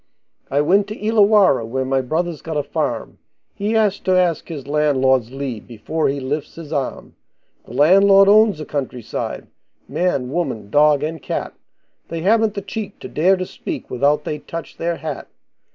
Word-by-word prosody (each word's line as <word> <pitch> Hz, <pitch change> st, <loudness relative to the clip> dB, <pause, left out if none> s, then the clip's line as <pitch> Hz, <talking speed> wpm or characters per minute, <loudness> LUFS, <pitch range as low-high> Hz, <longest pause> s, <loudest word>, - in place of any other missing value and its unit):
I 140 Hz, +2 st, +2 dB
went 195 Hz, +7 st, +3 dB
to 210 Hz, -, -6 dB
Illawarra, 210 Hz, -, +4 dB
where 130 Hz, +4 st, -2 dB
my 135 Hz, 0 st, +1 dB
brother's 160 Hz, +4 st, -2 dB
got 160 Hz, -2 st, -4 dB
a 145 Hz, -, 0 dB
farm, -, -, -3 dB, 0.3 s
He 205 Hz, +2 st, -2 dB
has 210 Hz, -3 st, +2 dB
to 185 Hz, -1 st, +1 dB
ask 175 Hz, -4 st, +1 dB
his 150 Hz, -6 st, -7 dB
landlord's 135 Hz, -5 st, +2 dB
leave 135 Hz, -5 st, -5 dB
before 130 Hz, +8 st, -2 dB
he 140 Hz, +1 st, -2 dB
lifts 145 Hz, +3 st, -4 dB
his 165 Hz, -2 st, -8 dB
arm; 140 Hz, -3 st, -3 dB, 0.5 s
The -, -, -12 dB
landlord 195 Hz, +7 st, +6 dB
owns 210 Hz, -2 st, +5 dB
the 155 Hz, -, -6 dB
country 130 Hz, -5 st, -4 dB
side -, -, -5 dB, 0.4 s
man, 140 Hz, -8 st, -1 dB
woman, 115 Hz, -11 st, -3 dB
dog, 150 Hz, -1 st, +4 dB
and 160 Hz, 0 st, -4 dB
cat, -, -, -4 dB, 0.5 s
They 165 Hz, -1 st, -5 dB
haven't 220 Hz, +3 st, +2 dB
the 200 Hz, -, -4 dB
cheek 205 Hz, +1 st, -6 dB
to -, -, -6 dB
dare 185 Hz, +5 st, +2 dB
to 185 Hz, -, -3 dB
speak -, -, -7 dB
without 145 Hz, +4 st, +2 dB
they 150 Hz, 0 st, -4 dB
touch 165 Hz, +3 st, -8 dB
their 170 Hz, 0 st, -1 dB
hat. 160 Hz, -1 st, -6 dB
155 Hz, 175 wpm, -20 LUFS, 135-190 Hz, 0.5 s, landlord